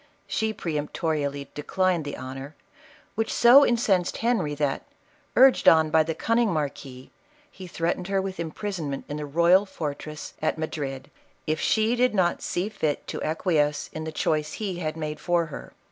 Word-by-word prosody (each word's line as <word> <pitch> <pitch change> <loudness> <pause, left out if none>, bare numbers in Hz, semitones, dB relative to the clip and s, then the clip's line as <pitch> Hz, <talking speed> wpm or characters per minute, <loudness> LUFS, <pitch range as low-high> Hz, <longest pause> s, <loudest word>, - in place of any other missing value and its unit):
She 220 0 -1
peremptorily 150 -4 -2
declined 175 +2 0
the 145 - -5
honor, 135 +3 -8 0.6
which 225 0 -1
so 245 +4 +7
incensed 210 -8 +1
Henry, 225 -11 0
that, 145 -2 -1 0.5
urged 265 +1 +6
on 160 -1 +4
by 160 - +5
the 160 0 -2
cunning 230 +3 +1
marquis, 140 -4 -5 0.4
he 185 -1 -10
threatened 175 +1 -2
her 195 0 +1
with 190 -1 -4
imprisonment 165 -3 -4
in 145 - -5
the 150 -1 -5
royal 170 +6 +4
fortress 155 -3 -6
at 155 0 0
Madrid, 140 -4 -5 0.3
if 155 0 -1
she 220 +2 +2
did 250 -2 +2
not 175 -3 +1
see 180 +3 -2
fit 160 -9 -2
to - - -4
acquiesce 155 -2 0
in 155 - -5
the 160 - -4
choice 150 -1 -1
he 195 -5 -4
had 155 -2 -3
made 155 -1 -4
for 175 -1 +1
her. - - -8
160 Hz, 160 wpm, -25 LUFS, 150-190 Hz, 0.6 s, so